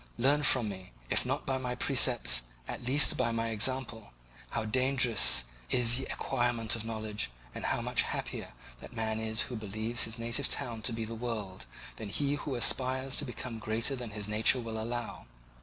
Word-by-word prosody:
Learn 140 +5 +2
from 130 -5 +4
me, 95 -2 -8 0.2
if - - +3
not - - -3
by 130 0 -2
my 125 -1 -4
precepts, 125 - +3 0.3
at - - -6
least 140 +3 +6
by 120 -2 0
my 115 0 -2
example, 115 - 0 0.4
how - - -3
dangerous 125 - +3 0.3
is 120 -1 +4
the 135 - -5
acquirement 120 -3 0
of 115 - -5
knowledge 110 - -3 0.2
and - - -6
how - - -1
much - - +3
happier - - -5 0.3
that - - -12
man 110 -1 -2
is 110 0 0
who 125 - -3
believes 110 +2 -1
his 115 +1 -5
native 120 +4 -1
town 115 -2 -1
to 120 - 0
be 115 -1 -4
the 115 - -7
world, 110 - -5 0.3
than 110 - -7
he 140 +6 -1
who 145 -2 -4
aspires 130 +2 +2
to 145 - +1
become 120 -2 -7
greater 110 +5 -1
than 125 -3 -7
his 105 -1 -5
nature 110 +4 +3
will 110 -2 -5
allow. 120 - -5
115 Hz, 185 wpm, -30 LUFS, 110-130 Hz, 0.4 s, least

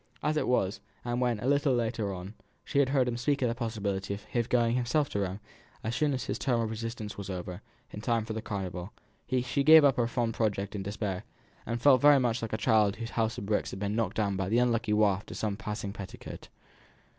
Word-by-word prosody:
As 150 +1 +1
it 150 - 0
was, 100 -5 +1 0.3
and 120 +1 -1
when, 120 -3 +1
a - - -4
little 140 -1 +3
later 115 -3 -1
on, 95 +2 -7 0.3
she 140 -1 +3
heard 130 -1 +2
him 120 -1 -1
speak 140 +2 0
of 125 - +2
the - - 0
possibility 100 -5 -2
of 100 - -11
his 120 -1 -2
going 120 -1 +2
himself 130 +4 +1
to 100 - -2
Rome, 95 0 -2 0.4
as 110 +2 -2
soon 145 +1 +1
as 125 - -3
his - - -3
term 125 -4 +1
of 115 -1 -1
residence 110 -2 -5
was 100 - -6
over, 90 0 -5 0.3
in 105 - -7
time 115 0 0
for 110 - -4
the 110 - -3
Carnival, 95 -2 -5 0.4
she 130 +2 0
gave 155 +1 +9
up 135 -3 +4
her 120 -2 +2
fond 120 -1 -1
project 100 -3 -1
in 100 - -3
despair, 100 -1 -3 0.4
and 115 0 -2
felt 135 -4 +6
very 145 -1 +7
much 120 -2 0
like 115 - -4
a - - +1
child 110 -3 +3
whose 115 0 -6
house 115 -1 0
of - - -5
bricks 105 +1 0
had 95 - -7
been 100 +1 -1
knocked 110 -4 -1
down 100 -3 +1
by 95 -1 -2
the 115 - +2
unlucky 120 -2 +2
waft 105 -2 +2
of - - -6
some 105 -2 -1
passing 105 -1 -5
petticoat. 100 -2 -9
115 Hz, 235 wpm, -29 LUFS, 100-125 Hz, 0.4 s, gave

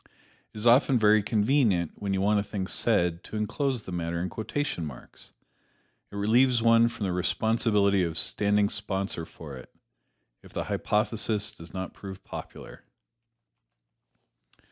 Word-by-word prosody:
It - - -13
is 105 - -6
often 125 +2 +5
very 110 -1 +5
convenient 105 - +1
when 100 -1 -4
you 95 0 0
want 105 +1 +3
a - - -1
thing 100 -2 -4
said 90 -5 +1
to - - -8
enclose 120 +3 -1
the - - -8
matter 85 -1 -3
in 90 +2 -2
quotation 110 - -3
marks. 70 -5 -9 0.8
It - - -10
relieves 120 +5 +3
one 115 0 +5
from 105 - -5
the 95 - -1
responsibility 100 +1 +1
of 85 -2 -2
standing 105 -2 +2
sponsor 100 -5 -3
for 75 -4 -10
it, 65 - -13 0.7
if - - -17
the - - -2
hypothesis 105 -1 -1
does 85 0 -13
not 95 -1 -5
prove 95 -1 -10
popular. - - -10
105 Hz, 145 wpm, -27 LUFS, 95-115 Hz, 0.8 s, often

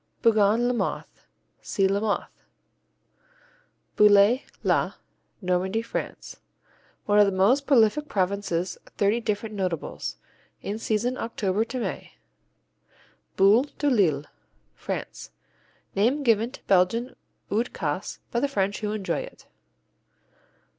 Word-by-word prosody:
Bougon 220 +1 +4
Lamothe 245 -1 -1 0.6
see 195 -1 +1
Lamothe. 200 +1 -1 1.6
Bouillé, 210 +4 +6 0.2
la - - +1 0.5
Normandy 185 +4 0
France 230 - -6 0.7
One 205 0 +3
of 205 - +6
this 195 - -1
most 255 +9 +3
prolific 275 +3 +3
province's 190 -3 -1 0.2
thirty 205 +3 +2
different 215 -1 -3
notables. 185 -6 -3 0.5
In 205 +2 -4
season 230 +3 -1
October 210 -2 -1
to 255 +2 -5
May. - - -5 1.2
Boule 205 +7 +5
de 290 -1 +1
Lille 160 - +2 0.5
France - - -6 0.6
Name 245 +9 +1
given 230 -2 +3
to 260 - -13
Belgian 200 +7 +2 0.4
Oude 230 +4 0
Kaas 155 +2 -3
by 235 - 0
the 285 - +1
French 200 -7 -1
who 210 0 -2
enjoy 205 -3 -2
it. - - -10
210 Hz, 110 wpm, -25 LUFS, 195-235 Hz, 1.6 s, Bouillé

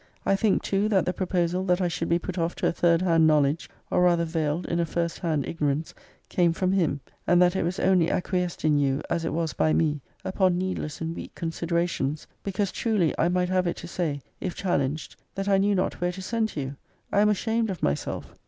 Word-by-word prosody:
I 195 - +3
think 200 0 +2
too, 200 +2 +1
that 195 -5 +3
the 180 - 0
proposal 180 -1 0
that 180 -1 +2
I 180 - +1
should 165 -1 -3
be 170 - +4
put 180 +1 -5
off 165 +1 -1
to - - -3
a - - +2
third 170 0 +2
hand 165 -3 +4
knowledge, 150 0 +2 0.2
or - - +3
rather 175 -1 +4
veiled 160 0 -1
in 170 - -1
a - - +3
first 170 +1 -2
hand 155 -6 -1
ignorance, 150 -1 -1 0.3
came 175 -2 +2
from 185 +2 0
him, 165 -7 +1 0.3
and 175 - +5
that 180 +1 +4
it - - +1
was 175 +3 -2
only 180 -3 +3
acquiesced 180 -2 -1
in 150 -1 +4
by - - +2
you, 135 0 +1
as 170 -1 0
it - - -1
was 165 -1 -1
by 155 - +2
me,* 150 -3 +1 0.2
upon 185 -2 +2
needless 185 -5 -3
and 165 +1 -3
weak - - -8
considera 170 +1 -1
tions; 150 -2 -3 0.2
because, 195 0 -1
truly, 210 -9 +1
I 170 - +3
might 180 0 +1
have 185 -1 +1
it 170 - -2
to - - -8
say, 160 -5 -2 0.2
if 185 - -4
challenged, 150 -5 -1 0.2
that 195 0 -3
I 195 -1 +4
knew 200 +1 +3
not 185 - -1
where 175 0 +1
to 190 - -7
send 225 +2 0
to 145 - -4
you! 135 +1 -5 0.3
I - - +3
am 210 - +5
ashamed 225 +2 0
of 185 -4 -5
myself! 70 - -2
175 Hz, 235 wpm, -26 LUFS, 160-185 Hz, 0.3 s, and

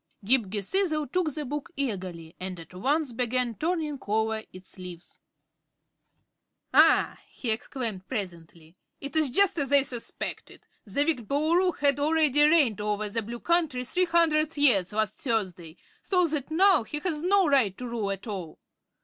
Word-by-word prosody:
Ghip 235 -3 +3
Ghisizzle 305 - 0
took 360 -4 0
the 300 +1 -5
book 290 +2 -5
eagerly 185 - -4
and 185 -1 -6
at 165 - -13
once 270 - -1
began 245 0 -1
turning 310 - -2
over 220 +1 0
its 185 +1 -11
leaves. 180 -2 -9 1.5
"Ah!" - - +4
he 235 - -3
exclaimed, 220 -4 -3
presently, 170 -7 -6 0.2
"it 280 +2 -6
is 310 -3 +3
just 370 +5 +2
as 280 -1 -2
I 280 -1 +6
suspected. 245 -4 -6 0.2
The 280 +9 +1
wicked 255 -9 0
Boolooroo 335 +6 +1
had 285 -1 +2
already 300 -1 +3
reigned 290 - +3
over 210 0 -2
the 230 +3 -2
Blue 235 +3 -7
Country 320 -7 0
three 365 +8 +1
hundred 325 -3 +2
years 220 -11 +4
last 215 -1 -2
Thursday, 185 - -3 0.2
so 360 -2 +2
that 295 -2 -2
now 370 0 +4
he 230 +7 -5
has 315 -4 -2
no 380 +1 +3
right 255 -10 +2
to 250 - -6
rule 230 -4 -3
at 195 0 -5
all. 190 -8 -6
255 Hz, 160 wpm, -27 LUFS, 205-310 Hz, 1.5 s, I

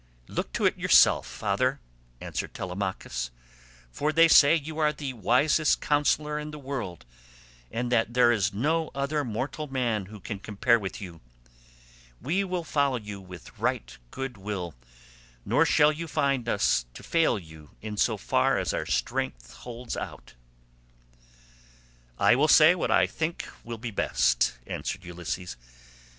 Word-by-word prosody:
"Look - - -4
to - - 0
it - - +2
yourself, - - +5
father," - - -1 0.4
answered - - -5
Telemachus, 90 -10 -4 0.6
"for 150 - -1
they 165 +1 +6
say 150 -1 +7
you 160 0 -4
are 150 -1 +3
the 145 -3 -5
wisest 130 - +2
counsellor 150 0 +1
in 150 0 -6
the 150 - -8
world, 130 -11 -6 0.7
and 120 +1 -3
that 120 0 +1
there 120 -1 +6
is 105 -4 +1
no 155 +10 0
other 140 +2 -1
mortal 130 +6 -4
man 120 -7 -1
who 105 +1 -11
can 100 +1 -6
compare 115 +4 +2
with 105 +3 -6
you. 85 -4 -9 1.0
We 180 +8 0
will 180 -2 -3
follow 140 -4 +1
you 105 -3 -8
with 90 -3 -12
right - - -2
good 135 - -6
will, 95 -4 -5 0.7
nor - - +3
shall 150 0 +5
you 165 +2 -5
find 140 -5 0
us 100 - +2
fail 165 -8 +1
you 80 -4 -12
in 105 -1 -6
so 100 - +1
far - - +1
as - - -1
our - - -2
strength - - -2
holds 120 0 -7
out." - - -7 1.8
"I - - +5
will 145 +4 +3
say 155 +2 +7
what 180 - -2
I - - +4
think 165 +1 -3 0.2
will 115 0 -6
be 115 +1 -6
best," - - +1
answered 95 -1 -5
Ulysses. 90 +1 -5
120 Hz, 150 wpm, -27 LUFS, 100-150 Hz, 1.8 s, say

